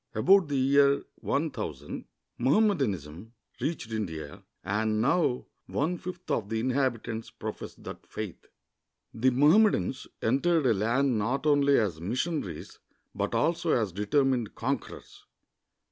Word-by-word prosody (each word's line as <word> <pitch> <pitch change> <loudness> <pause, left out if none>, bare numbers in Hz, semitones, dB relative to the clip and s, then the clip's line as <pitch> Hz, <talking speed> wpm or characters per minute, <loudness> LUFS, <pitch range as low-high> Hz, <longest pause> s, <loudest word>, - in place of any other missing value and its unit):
About 195 -2 +5
the 145 -1 -1
year 140 +1 +4
1000, 125 - -3 0.3
Mohammedanism 120 - +1 0.3
reached 145 -8 -3
India, 80 -9 -5 0.2
and 110 +3 0
now 125 +1 +1 0.2
one 165 +5 -1
fifth 180 0 -7
of 105 -3 -1
the 110 0 -1
inhabitants 120 -3 -1
profess - - -7
that - - -10
faith. - - -7 0.7
The 125 +3 +3
^Mohammedans 150 - +3 0.2
entered 150 +6 +2
a 120 - +5
land 115 +4 +1
not 125 +8 -1
only 140 -2 +4
as 90 -8 0
mission 130 - -1
aries, 85 -5 -9 0.3
but - - -2
also 170 -1 +1
as 110 -5 +1
determined 120 - 0
conquerors. - - -5
130 Hz, 120 wpm, -28 LUFS, 110-145 Hz, 0.7 s, About